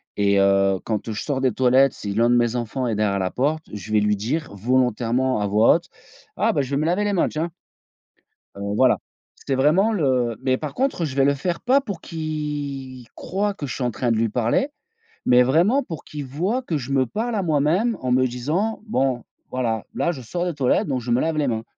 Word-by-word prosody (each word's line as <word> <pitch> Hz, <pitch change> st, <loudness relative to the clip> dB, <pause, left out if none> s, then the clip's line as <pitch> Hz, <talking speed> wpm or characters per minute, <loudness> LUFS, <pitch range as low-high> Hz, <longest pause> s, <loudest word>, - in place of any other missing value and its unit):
et 100 Hz, -1 st, +3 dB
heu, 100 Hz, -1 st, +3 dB
quand, 110 Hz, -1 st, -2 dB
heu, -, -, -2 dB
je 105 Hz, -, -4 dB
sors 140 Hz, -3 st, -2 dB
des 130 Hz, -1 st, +2 dB
toilettes 130 Hz, +2 st, +4 dB
si 100 Hz, -1 st, -5 dB
l'un 115 Hz, +3 st, +3 dB
de 120 Hz, -, +4 dB
mes 120 Hz, 0 st, +2 dB
enfants 120 Hz, +2 st, -2 dB
est 110 Hz, -, -1 dB
derrière 100 Hz, -2 st, +1 dB
la 95 Hz, -1 st, -1 dB
porte, 150 Hz, +5 st, 0 dB
je 105 Hz, +1 st, -7 dB
vais 110 Hz, -, +4 dB
lui 105 Hz, 0 st, +2 dB
dire 130 Hz, +7 st, -3 dB
volontairement 125 Hz, +2 st, +1 dB
à 105 Hz, -, 0 dB
voix 105 Hz, +3 st, +5 dB
haute: 175 Hz, +2 st, -15 dB, 0.5 s
«Ah 225 Hz, -, +2 dB
bah, 145 Hz, -, +1 dB
je 130 Hz, -, -4 dB
vais 140 Hz, -, 0 dB
me 155 Hz, -, 0 dB
laver 180 Hz, +5 st, +1 dB
les 205 Hz, 0 st, 0 dB
mains, 185 Hz, -, +2 dB
tiens». 160 Hz, +3 st, -2 dB, 1.1 s
Heu, 100 Hz, -, -8 dB, 0.2 s
voilà, 130 Hz, +1 st, +4 dB, 0.4 s
c'était 135 Hz, -, -3 dB
vraiment 155 Hz, +11 st, +3 dB
le 130 Hz, -, +1 dB
mais 130 Hz, -1 st, +2 dB
par 150 Hz, -3 st, -5 dB
contre 265 Hz, -10 st, 0 dB
je 140 Hz, -4 st, -3 dB
vais 135 Hz, -, +4 dB
le 140 Hz, 0 st, +3 dB
faire 170 Hz, +5 st, -3 dB
pas 265 Hz, +3 st, +3 dB
pour 200 Hz, -11 st, -6 dB
qu' -, -, -13 dB
il 145 Hz, -5 st, -4 dB
croie 200 Hz, +2 st, -2 dB
que 145 Hz, -, -5 dB
je 130 Hz, -, -5 dB
suis 130 Hz, -, -3 dB
en 120 Hz, -, +1 dB
train 120 Hz, +1 st, -1 dB
de 115 Hz, -, +2 dB
lui 115 Hz, +1 st, +1 dB
parler, 120 Hz, -, +1 dB, 0.6 s
mais 125 Hz, 0 st, +6 dB
vraiment 170 Hz, -, +3 dB
pour 165 Hz, -10 st, -8 dB
qu'il 150 Hz, -2 st, -7 dB
voie 185 Hz, -, -1 dB
que 170 Hz, -10 st, -2 dB
je 135 Hz, -1 st, -4 dB
me 130 Hz, -1 st, +2 dB
parle 225 Hz, -, -3 dB
à 200 Hz, -, 0 dB
moi-même 170 Hz, +8 st, +1 dB
en 125 Hz, -1 st, -1 dB
me 130 Hz, 0 st, +4 dB
disant: 150 Hz, -, -2 dB
«Bon 130 Hz, -, 0 dB, 0.3 s
voilà, 115 Hz, -4 st, -1 dB
là 170 Hz, -, 0 dB
je 130 Hz, -5 st, -8 dB
sors 175 Hz, +9 st, -3 dB
des 175 Hz, -2 st, -2 dB
toilettes 135 Hz, -3 st, +1 dB
donc 130 Hz, -3 st, -1 dB
je 120 Hz, 0 st, -5 dB
me 120 Hz, -, +3 dB
lave 160 Hz, -1 st, 0 dB
les 145 Hz, -3 st, +1 dB
mains» 110 Hz, -1 st, -2 dB
130 Hz, 235 wpm, -22 LUFS, 120-160 Hz, 1.1 s, mais